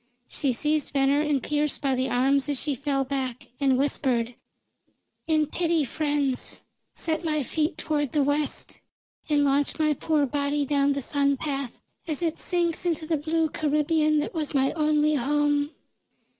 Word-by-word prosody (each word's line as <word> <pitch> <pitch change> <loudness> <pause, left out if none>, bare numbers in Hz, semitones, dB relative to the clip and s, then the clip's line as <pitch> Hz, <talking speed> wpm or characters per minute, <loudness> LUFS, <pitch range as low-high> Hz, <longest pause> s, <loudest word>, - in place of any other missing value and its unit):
She 275 - 0
seized 300 +4 0
Venner 275 +1 +3
and 295 -4 0
Pearse 295 0 0
by 275 -2 0
the 260 +1 0
arms 270 +3 +2
as 285 -3 0
she 295 - -1
fell 275 +1 -1
back, 260 -2 -4
and 270 -2 +3
whispered: 255 -4 0 0.9
"In 310 -1 +3
pity, 330 0 0
friends, 290 -1 -1 0.3
set 320 +1 -2
my 305 -3 0
feet 305 +4 -1
toward 295 -4 -1
the 295 -2 +2
west, 290 +1 -1 0.5
and 290 -1 +3
launch 280 +1 +1
my 305 -1 +2
poor 300 0 +1
body 285 +1 -1
down 280 0 +2
the 280 -1 -3
sun 280 +1 +1
path 275 -3 -3 0.3
as 310 +1 -1
it 325 -2 -1
sinks 345 -2 0
into 330 -3 -1
the 320 0 0
blue 320 +2 0
Caribbean 305 +1 +1
that - - -4
was 310 -3 -2
my 270 0 +3
only 305 -1 +2
home." 290 +1 +1
290 Hz, 160 wpm, -26 LUFS, 275-305 Hz, 0.9 s, Venner